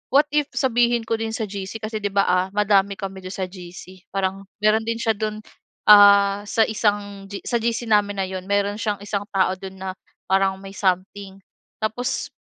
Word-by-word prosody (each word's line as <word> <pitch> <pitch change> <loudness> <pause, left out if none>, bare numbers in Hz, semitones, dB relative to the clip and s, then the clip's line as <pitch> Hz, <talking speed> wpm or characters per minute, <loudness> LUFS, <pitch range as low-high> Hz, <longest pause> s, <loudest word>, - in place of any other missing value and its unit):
what 290 +2 +6
if 295 -1 +1
sabihin 240 -2 +2
ko 225 0 -2
din 225 0 -3
sa 225 - -2
GC 195 -1 -6
kasi 215 0 -3
'di 205 - -1
ba, 200 0 +4
ah, 180 +1 +2
madami 200 -1 +3
kami 195 0 -6
do'n 185 +1 -8
sa 190 - -2
GC. 180 0 -12
Parang 195 0 -2 0.2
meron 215 +1 +4
din 230 0 -1
siya 225 -1 +1
do'n, 215 0 -3 0.5
ah, 200 -1 +7
sa 225 - +3
isang 205 -2 -2
G 200 0 -7
sa 235 -1 0
GC 235 +1 -1
namin 205 -2 +2
na 195 - 0
'yon, 185 0 -6
meron 200 0 +1
siyang 210 -3 -1
isang 205 -1 -2
tao 190 -1 +1
do'n 190 -1 -8
na 190 0 -5 0.4
parang 190 0 +2
may 195 0 -9
something. 190 +1 -2 0.4
Tapos 245 +4 -2
200 Hz, 195 wpm, -22 LUFS, 195-220 Hz, 0.5 s, ah